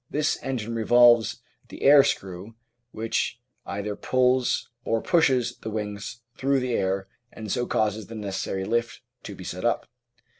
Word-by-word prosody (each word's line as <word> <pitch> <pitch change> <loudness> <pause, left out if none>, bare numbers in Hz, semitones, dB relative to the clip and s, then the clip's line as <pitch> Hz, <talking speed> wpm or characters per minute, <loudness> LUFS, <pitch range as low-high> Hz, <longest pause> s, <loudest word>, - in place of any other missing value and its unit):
This 150 +1 0
engine 115 -4 -3
revolves 120 0 +4 0.3
the - - -9
air 140 0 +8
screw 95 +2 -3 0.3
which 115 +1 -2 0.3
either 100 +1 -3
pulls 130 +1 +1 0.2
or 115 -2 0
pushes 135 -6 +2
the - - -6
wings 105 +2 -5
through 135 0 +1
the 125 -1 -2
air 95 -2 0 0.2
and 110 -2 -7
so 120 -1 -1
causes 110 -1 0
the 115 - -9
necessary 95 -2 -3
lift 120 +2 -1 0.2
to 100 - -8
be 95 - -10
set 90 +1 -6
up. 120 - +1
115 Hz, 150 wpm, -25 LUFS, 105-125 Hz, 0.3 s, air